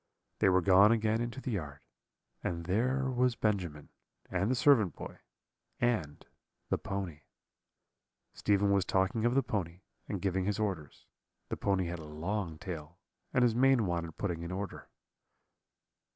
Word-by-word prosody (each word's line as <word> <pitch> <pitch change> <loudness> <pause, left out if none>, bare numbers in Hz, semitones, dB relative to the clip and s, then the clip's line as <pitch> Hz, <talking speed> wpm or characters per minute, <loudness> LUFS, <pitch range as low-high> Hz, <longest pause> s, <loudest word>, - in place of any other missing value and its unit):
"They - - +5
were 95 0 +4
gone 100 +4 +7
again 110 0 +2
into 120 +2 -3
the 130 - -3
yard, 75 -9 -4 0.6
and 85 -1 -3
there 130 +8 +1
was 125 -1 +2
Benjamin, 90 -10 -1 0.4
and 95 +3 +1
the 130 - +2
servant 120 - +4
boy, - - -8 0.6
and 110 -12 0 0.4
the - - +1
pony. 95 -6 -4 1.1
Stephen 100 -1 +2
was 100 -1 +3
talking 95 +5 +1
of 120 +1 +2
the 135 - +4
pony, 90 -3 -3 0.3
and 100 - -2
giving 95 0 0
his 105 0 0
orders: 95 -9 -3 0.4
the - - -1
pony 95 -2 +1
had 85 0 -4
a - - -8
long 85 +3 -3
tail, 85 -2 -7 0.3
and 125 -2 +3
his 120 -2 +4
mane 130 -1 +4
wanted 85 -3 -3
putting 85 -5 -2
in 85 +1 -5
order. 100 +2 -5
100 Hz, 150 wpm, -32 LUFS, 85-110 Hz, 1.1 s, gone